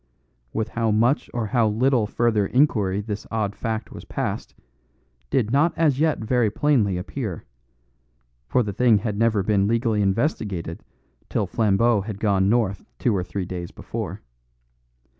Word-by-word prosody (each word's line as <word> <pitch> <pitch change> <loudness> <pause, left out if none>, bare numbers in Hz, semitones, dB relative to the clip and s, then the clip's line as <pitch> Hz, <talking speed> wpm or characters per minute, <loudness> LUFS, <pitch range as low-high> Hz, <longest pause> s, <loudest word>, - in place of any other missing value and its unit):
With 110 +5 -2
how 115 -1 0
much 115 +7 +2
or 120 -2 -2
how 115 0 +2
little 120 +1 +2
further 110 -3 +1
inquiry 105 -8 +2
this 105 -1 -5
odd 105 -2 -2
fact 110 0 -3
was - - -9
passed, - - -4 0.7
did 115 - +1
not 150 +6 +3
as 150 -5 +2
yet 155 -1 +2
very 115 0 +1
plainly 110 -6 +2
appear; 95 - -5 1.0
for 125 - +2
the 105 -2 -4
thing 120 0 +4
had 105 0 -2
never 110 -2 +2
been 100 -1 +2
legally 115 -1 +1
investigated 100 - -1 0.5
till - - 0
Flambeau 110 0 +2
had 100 0 -6
gone 100 -3 +2
north 105 -4 +1
two 120 -4 +1
or 90 - 0
three 90 +1 -4
days 90 -1 -5
before. - - -6
110 Hz, 150 wpm, -23 LUFS, 100-120 Hz, 1.0 s, thing